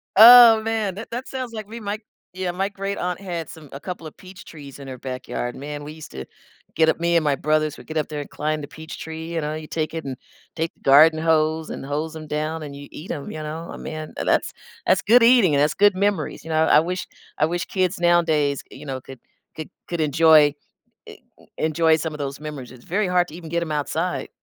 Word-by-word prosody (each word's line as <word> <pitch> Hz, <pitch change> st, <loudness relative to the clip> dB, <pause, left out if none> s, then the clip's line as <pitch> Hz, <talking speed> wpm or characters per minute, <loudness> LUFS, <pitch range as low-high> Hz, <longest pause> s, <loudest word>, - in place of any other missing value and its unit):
Oh, 230 Hz, +1 st, +10 dB
man. 220 Hz, -4 st, -1 dB
That-that 230 Hz, +4 st, -6 dB
sounds 255 Hz, -3 st, -5 dB
like 215 Hz, -2 st, -6 dB
we 230 Hz, +2 st, -8 dB
might 210 Hz, 0 st, -4 dB, 0.3 s
yeah, 185 Hz, -1 st, -3 dB
my 190 Hz, +3 st, -2 dB
great-aunt 195 Hz, -3 st, -3 dB
had 175 Hz, -4 st, -5 dB
some 155 Hz, -3 st, -12 dB
a 140 Hz, -, -8 dB
couple 180 Hz, 0 st, -7 dB
of 155 Hz, -, -9 dB
peach 185 Hz, -1 st, -13 dB
trees 145 Hz, -4 st, -11 dB
in 140 Hz, -1 st, -10 dB
her 130 Hz, -1 st, -8 dB
backyard, 125 Hz, -1 st, -5 dB
man, 145 Hz, +1 st, -7 dB
we 150 Hz, +1 st, -8 dB
used 155 Hz, -1 st, -11 dB
to 65 Hz, 0 st, -7 dB, 0.5 s
get 160 Hz, -1 st, +4 dB
up 160 Hz, -, +2 dB
me 170 Hz, 0 st, +1 dB
and 165 Hz, -, +1 dB
my 145 Hz, -2 st, +2 dB
brothers 155 Hz, +1 st, 0 dB
would -, -, -14 dB
get 160 Hz, -, -4 dB
up 155 Hz, -, 0 dB
there 150 Hz, -1 st, -5 dB
and 145 Hz, -, -9 dB
climb 155 Hz, 0 st, -2 dB
the 145 Hz, -, -7 dB
peach 160 Hz, +2 st, -10 dB
tree, 160 Hz, +1 st, -7 dB
you 165 Hz, -, -1 dB
know, 150 Hz, +1 st, -3 dB
you 155 Hz, 0 st, -7 dB
take 155 Hz, +1 st, -3 dB
it 160 Hz, -, -5 dB
and 135 Hz, -1 st, -4 dB, 0.4 s
take 165 Hz, 0 st, -2 dB
the -, -, -34 dB
garden 155 Hz, +4 st, +6 dB
hose 160 Hz, 0 st, +1 dB
and -, -, -6 dB
hose 150 Hz, +3 st, -3 dB
'em 155 Hz, -1 st, -8 dB
down 155 Hz, +2 st, -3 dB
and 145 Hz, -2 st, -7 dB
you 140 Hz, 0 st, -10 dB
eat 160 Hz, -, -10 dB
'em, 140 Hz, -, -5 dB
you 155 Hz, -, -6 dB
know? 155 Hz, +2 st, -6 dB
Oh -, -, -8 dB
man, 155 Hz, -1 st, -7 dB
uh, -, -, -2 dB
that's -, -, +1 dB, 0.3 s
that's 185 Hz, -, +3 dB
good 235 Hz, +3 st, +5 dB
eating 230 Hz, -, +5 dB
and 140 Hz, -, +3 dB
that's 150 Hz, -, +1 dB
good 205 Hz, -1 st, +4 dB
memories, 200 Hz, +1 st, -1 dB
you 160 Hz, -, -7 dB
know, 160 Hz, 0 st, +3 dB
I -, -, +6 dB
wish 180 Hz, +3 st, -4 dB, 0.3 s
I 155 Hz, -, +4 dB
wish 175 Hz, +1 st, -2 dB
kids 185 Hz, -1 st, -1 dB
nowadays, 160 Hz, -5 st, +2 dB
you 140 Hz, +3 st, -12 dB
know, 130 Hz, -2 st, -5 dB
could 130 Hz, 0 st, -12 dB, 0.4 s
could 155 Hz, -, -7 dB, 0.2 s
could 170 Hz, -, -4 dB
enjoy 155 Hz, -1 st, +5 dB, 0.5 s
eh, -, -, -9 dB, 0.3 s
e -, -, -21 dB
enjoy 160 Hz, +1 st, +3 dB
some 160 Hz, 0 st, -4 dB
of 150 Hz, -, -8 dB
those 140 Hz, -1 st, -4 dB
memories, 150 Hz, -5 st, -7 dB
it's 125 Hz, -2 st, -15 dB
very 200 Hz, +3 st, 0 dB
hard 180 Hz, -1 st, +2 dB
to 150 Hz, -, -11 dB
even 165 Hz, -2 st, -9 dB
get 170 Hz, +1 st, 0 dB
'em 160 Hz, -, -6 dB
outside. 160 Hz, +4 st, -2 dB
160 Hz, 245 wpm, -22 LUFS, 150-180 Hz, 0.5 s, Oh